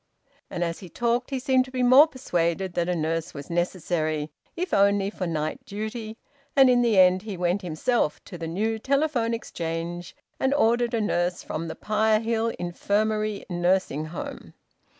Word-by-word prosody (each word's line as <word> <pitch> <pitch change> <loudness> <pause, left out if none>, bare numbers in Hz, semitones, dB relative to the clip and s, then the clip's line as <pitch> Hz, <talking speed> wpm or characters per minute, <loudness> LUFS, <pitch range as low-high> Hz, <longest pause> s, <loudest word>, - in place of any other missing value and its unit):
And 175 - -2
as 165 -1 -3
he 185 - -10
talked 240 +5 0
he 270 - -2
seemed 260 0 +2
to 260 - -13
be 255 -1 -1
more 260 +5 +8
persuaded 180 - -1
that 175 0 0
a 180 - +1
nurse 165 0 -2
was 140 +3 -8
necessary, 160 -3 -1 0.2
if 360 +2 -3
only 200 0 +3
for 185 -4 -4
night 155 -2 -3
duty, 220 +2 -6 0.4
and 265 -2 +7
in 245 -1 +4
the 230 -4 +2
end 185 0 +6
he 210 -2 -6
went 180 +3 0
himself 175 +1 0
to 190 - -9
the 165 -1 -5
new 220 +7 -1
Telephone 275 -2 +1
Exchange 170 -4 -5 0.2
and 265 +1 +2
ordered 235 -2 +2
a 225 - 0
nurse 175 -3 0
from 165 +2 -4
the 160 - -5
Pirehill 220 +1 +1
Infirmary 210 +4 -1
Nursing 175 -4 0
Home. 155 +2 -8
200 Hz, 170 wpm, -25 LUFS, 175-235 Hz, 0.4 s, more